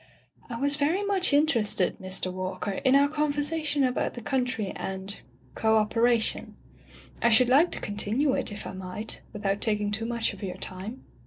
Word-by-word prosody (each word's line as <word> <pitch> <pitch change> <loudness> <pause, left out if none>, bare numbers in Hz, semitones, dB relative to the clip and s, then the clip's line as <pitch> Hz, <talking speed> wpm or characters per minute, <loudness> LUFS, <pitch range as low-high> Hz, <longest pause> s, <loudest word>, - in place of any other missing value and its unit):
*'I 235 - -4
was 285 +1 +3
very 315 +7 +1
much 390 -3 +2
interested, 235 - +2
Mr. 185 -1 -1
Walker, 185 +2 -4
in 260 +7 +2
our 280 +1 +5
conversation 295 0 0
about 255 -1 0
the 240 - -7
country 245 -6 -1
and 190 +1 -5 0.2
— 125 0 -31
co 220 0 +4
operation. 230 +1 +1 0.7
I 235 - +4
should 240 +2 +5
like 295 +7 +5
to - - -4
continue 220 +7 0
it, - - 0
if 205 - -7
I - - -6
might, 190 +3 -5
without 200 -2 -2
taking 210 -2 +1
too 220 +2 -2
much 235 -1 -1
of - - -12
your 185 -2 -5
time.' 190 +8 -6
225 Hz, 175 wpm, -27 LUFS, 200-280 Hz, 0.7 s, our